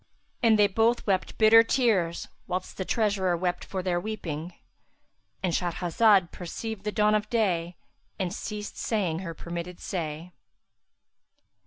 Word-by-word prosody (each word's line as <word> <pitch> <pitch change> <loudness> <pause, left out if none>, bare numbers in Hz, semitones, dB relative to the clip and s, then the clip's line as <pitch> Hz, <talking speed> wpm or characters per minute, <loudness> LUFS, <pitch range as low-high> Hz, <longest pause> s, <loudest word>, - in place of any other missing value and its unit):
And 225 -3 +5
they 210 - +6
both 225 +4 +2
wept 190 -3 0
bitter 225 +1 +8
tears 220 -9 +1 0.2
whilst 185 0 -4
the 190 - -3
treasurer 200 -6 +1
wept 180 0 -2
for 190 -2 -4
their 175 -1 0
weeping;—And 175 -1 -7
Shahrazad 180 +2 +2
perceived 200 +4 -6
the 210 - 0
dawn 210 0 +3
of 215 0 0
day 180 -7 0 0.4
and 185 -3 -2
ceased 210 -1 -6
saying 185 -8 -1
her 170 -3 -6
permitted 170 +2 -6
say. 165 -1 -4
190 Hz, 130 wpm, -27 LUFS, 175-215 Hz, 0.4 s, bitter